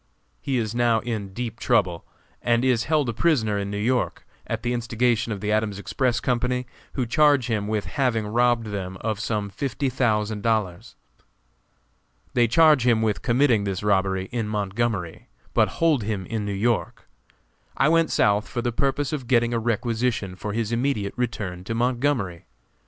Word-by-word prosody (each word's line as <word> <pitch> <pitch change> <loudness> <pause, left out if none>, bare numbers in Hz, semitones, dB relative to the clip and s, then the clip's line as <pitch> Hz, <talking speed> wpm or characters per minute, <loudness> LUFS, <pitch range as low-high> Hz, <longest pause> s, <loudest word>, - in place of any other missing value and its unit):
He 135 -2 -1
is 110 -2 -1
now 120 -1 +2
in 110 -5 -4
deep 115 +2 -5
trouble, 95 -9 +1 0.4
and 120 +1 +2
is 120 -3 +2
held 155 -4 +1
a - - -1
prisoner 110 -7 +1
in 100 0 -3
New 100 - -3
York, 120 +4 -1 0.2
at 115 0 -3
the 120 0 0
instigation 120 -1 0
of 100 -3 -4
the 105 - -1
Adams 105 -2 0
Express 120 +3 0
Company, 125 +1 0 0.3
who 130 - -1
charge 145 +1 +4
him 110 -4 -1
with 105 -1 -1
having 125 -6 0
robbed 120 +1 +2
them 95 -2 -4
of 110 -2 -2
some 105 -2 -2
fifty 130 +5 -2
thousand 110 -4 0
dollars. 105 -6 -1 1.4
They 120 -1 +4
charge 150 +1 +5
him 115 -2 +3
with 110 -2 0
committing 120 -3 +3
this 100 -1 -3
robbery 95 -2 +1
in 115 -3 -2
Montgomery, 105 -3 -2 0.3
but - - +4
hold 160 -6 +3
him 100 -3 -3
in 110 +2 -3
New 100 - -2
York. 110 +3 -1 0.7
I 135 - +4
went 165 +1 +3
South 105 +1 +2
for 120 -1 -4
the 120 - 0
purpose 140 +4 -1
of 135 -5 -4
getting 120 -1 +2
a 115 - +1
requisition 115 -3 -1
for 105 +3 -5
his 115 0 -2
immediate 120 -4 -1
return 100 -7 -3
to 115 - -3
Montgomery. 120 -7 0
115 Hz, 170 wpm, -24 LUFS, 105-125 Hz, 1.4 s, charge